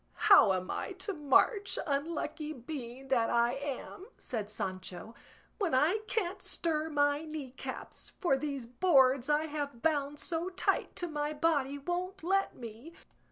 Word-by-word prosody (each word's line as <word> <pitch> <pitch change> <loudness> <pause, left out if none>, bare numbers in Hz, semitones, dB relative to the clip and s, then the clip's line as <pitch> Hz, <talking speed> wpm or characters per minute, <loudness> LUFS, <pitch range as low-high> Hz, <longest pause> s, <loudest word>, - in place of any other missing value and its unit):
"How 220 - +9
am 185 0 -2
I - - -3
to 380 +2 -4
march, 380 - +3
unlucky 305 +1 -2
being 260 -1 -7
that 235 -4 +3
I 235 +1 +3
am?" 280 +7 -5
said 215 -4 -4
Sancho, 185 +1 -5 0.5
"when 370 -10 +1
I 320 +11 +3
can't 385 -3 -1
stir 320 -3 -1
my 290 0 +2
knee 305 -4 -6
caps, 265 - -7
for 345 -7 +2
these 275 -3 -3
boards 265 -1 +4
I 300 +1 +3
have 290 -5 -5
bound 295 -2 +1
so 335 +3 -2
tight 370 - 0
to 350 - -3
my 300 -1 -2
body 290 -3 +1
won't 355 +5 -3
let 390 +3 +1
me. 235 +7 -9
295 Hz, 150 wpm, -32 LUFS, 260-335 Hz, 0.5 s, How